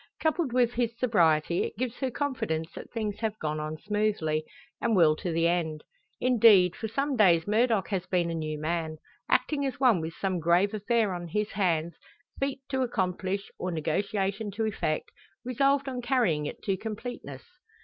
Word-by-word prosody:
Coupled 315 -3 0
with 245 -1 +2
his 235 -1 -1
sobriety, 170 -9 +2
it - - -5
gives 250 0 -3
her 265 - 0
confidence 225 - -2
that - - -9
things 215 -3 -3
have 220 -2 -2
gone 155 -3 -2
on 155 +1 -4
smoothly, 205 -6 0 0.4
and 230 -2 +2
will 160 -4 +5
to 180 - -3
the 165 +1 +2
end. 165 -3 -1 0.4
Indeed, 220 -8 +5
for 220 - -4
some 275 +5 -1
days 175 -7 +5
Murdock 215 -3 +2
has 185 -2 -2
been 175 -2 +1
a - - -3
new 155 -2 -3
man 160 0 -2 0.3
acting 290 -2 +2
as 270 -2 -3
one 240 -10 +4
with 160 +1 -5
some 190 -2 -1
grave 175 +5 +3
affair 215 -1 +1
on 175 -1 -5
his 210 +5 -2
hands 170 -4 0 0.5
feat 275 -1 -2
to 265 -1 0
accomplish, 195 -4 -2
or 185 - -2
negotiation 195 +5 -1
to 215 +3 -2
effect 175 -7 -2 0.3
resolved 275 +3 +2
on 255 -2 -3
carrying 235 - +1
it - - -8
to 195 -1 0
completeness. 225 +4 -6
200 Hz, 175 wpm, -28 LUFS, 170-235 Hz, 0.5 s, will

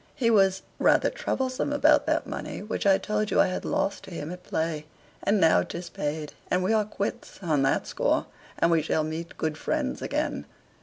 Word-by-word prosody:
"He 230 -3 +2
was 195 -3 +4 0.2
rather - - +4
troublesome 260 +2 -2
about 290 - +4
that - - +1
money - - -5
which 210 -1 -2
I 195 -1 +6
told 210 +1 -1
you - - +2
I - - +7
had 185 - -3
lost 200 - -1
to - - -11
him 165 -1 -5
at 180 0 -8
play. 160 -3 -2 0.3
And 205 +1 +2
now 160 -3 +5
'tis 175 0 -6
paid, 150 0 -3 0.2
and 180 0 +1
we 200 +4 +2
are 215 -1 +3
quits 205 -1 -4
on 155 -5 +2
that 135 - +2
score, - - 0 0.3
and 170 - +3
we 165 -1 +4
shall 155 0 0
meet 160 +2 -5
good 155 -1 -2
friends - - -1
again." - - -2
180 Hz, 200 wpm, -27 LUFS, 160-210 Hz, 0.3 s, I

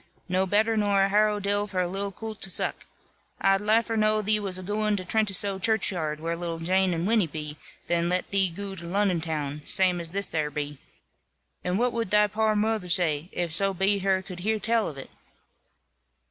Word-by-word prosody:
No 185 +1 +1
better 220 +4 +2
nor 205 -2 +2
a 195 - +2
harrow 210 +1 +3
dill 205 +1 0
for 190 -2 -3
a 180 - +1
little 195 +2 -3
coolt 220 +2 -8
to 195 - +1
zuck. - - -1 0.5
I'd 195 0 +3
liefer 225 +2 +2
know 215 0 +2
thee 215 +1 +3
was 195 -3 -2
a 185 - -7
gooin' 210 +2 0
to 185 - -5
Trentisoe 200 -1 +1
churchyard, 180 -7 0
where 165 +1 -2
little 170 -1 -4
Jane 185 +3 +1
and 165 +1 -2
Winny 215 -3 +2
be, 150 -1 -6 0.3
than 170 0 0
let 180 +1 -1
thee 195 -2 +4
goo 195 +3 -7
to 170 -1 -8
Lonnon 190 -2 +1
town, 150 -2 -3
zame 180 -2 +2
as 165 - -1
this 200 +2 0
here 155 -2 -1
be. 145 -1 -5 0.8
And 180 +1 0
what 245 +2 +1
wud 230 -4 -2
thy 210 +1 +5
poor 215 +1 0
moother 210 -3 0
zay, 165 -2 +1
if 175 -2 -2
so 195 +3 +2
be 195 +2 +2
her 190 -1 +1
could 185 -2 -9
hear 220 +4 0
tell 225 +1 +1
of 145 - -10
it?" 135 - -9
195 Hz, 205 wpm, -26 LUFS, 175-210 Hz, 0.8 s, thy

